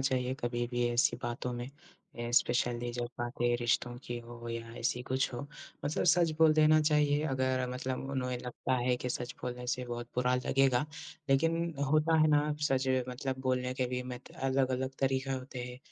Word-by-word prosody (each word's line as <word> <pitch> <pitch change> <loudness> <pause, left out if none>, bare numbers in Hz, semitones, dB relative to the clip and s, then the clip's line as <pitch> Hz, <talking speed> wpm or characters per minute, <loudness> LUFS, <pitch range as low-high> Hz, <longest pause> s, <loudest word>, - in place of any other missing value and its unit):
चाहिए 130 -1 0
कभी 120 0 -1
भी 120 -1 0
ऐसी 120 0 +2
बातों 120 +1 -3
में 120 0 -4 0.5
अ, 120 0 -3
स्पेशली 120 -1 +2
जब 120 0 -2
बातें 120 0 0
रिश्तों 120 +1 +1
की 120 0 -4
हो 120 0 -9
या 115 0 -5
ऐसी 120 +1 0
कुछ 130 +1 0
हो 120 - -4 0.4
मतलब 150 +4 0
सच 170 -1 +5
बोल 160 -1 +7
देना 155 0 +6
चाहिए, 150 -1 +3
अगर 130 -2 0
मतलब 130 +1 -3
उन्हें 125 -2 -1
लगता 125 +1 -2
है 125 0 +1
कि 125 - -4
सच 120 0 -4
बोलने 125 0 -4
से 125 +1 -1
बहुत 120 0 -4
बुरा 125 0 +2
लगेगा, 135 +1 +2 0.5
लेकिन 165 +4 +2 0.2
होता 155 +1 +4
है 155 - +5
ना 150 0 +3 0.2
सच 130 0 +1 0.2
मतलब 130 +1 -3
बोलने 130 0 0
के 130 -1 0
भी 125 0 -2
मत 125 0 -8
अलग-अलग 130 -1 +1
तरीक़ा 135 0 +1
होते 130 -1 -5
हैं, 125 0 -8
125 Hz, 180 wpm, -32 LUFS, 120-135 Hz, 0.5 s, बोल